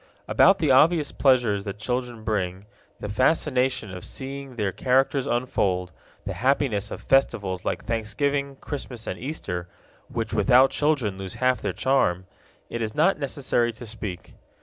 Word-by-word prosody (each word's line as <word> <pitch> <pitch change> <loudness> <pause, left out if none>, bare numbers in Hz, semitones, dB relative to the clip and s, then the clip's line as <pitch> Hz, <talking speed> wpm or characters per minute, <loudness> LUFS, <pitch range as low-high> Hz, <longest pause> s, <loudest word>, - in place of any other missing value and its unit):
About 195 - +5
the 155 -7 +2
obvious 150 +3 +4
pleasures 120 -7 +2
that 100 0 -5
children 125 0 -3
bring, 100 -3 -2 0.3
the - - -5
fascination 130 - +1
of 90 -1 -8
seeing 135 -1 -6
their 105 -4 -1
characters 135 +4 +1
unfold, 95 -8 0 0.3
the - - -3
happiness 125 -5 +1
of - - -7
festivals 100 -9 +1
like - - -2
Thanksgiving, 140 +5 -1
Christmas, 130 -5 -6
and 90 - -4
Easter, 95 - -4 0.4
which - - -4
without 130 +2 +5
children 135 -11 0
lose 95 -1 -6
half 130 0 +1
their - - -1
charm, 95 -10 +1 0.4
it 120 - -5
is 110 -1 -3
not 165 +2 +3
necessary 130 -4 0
to 115 +2 -10
speak. 105 -5 -7
125 Hz, 150 wpm, -25 LUFS, 105-135 Hz, 0.4 s, About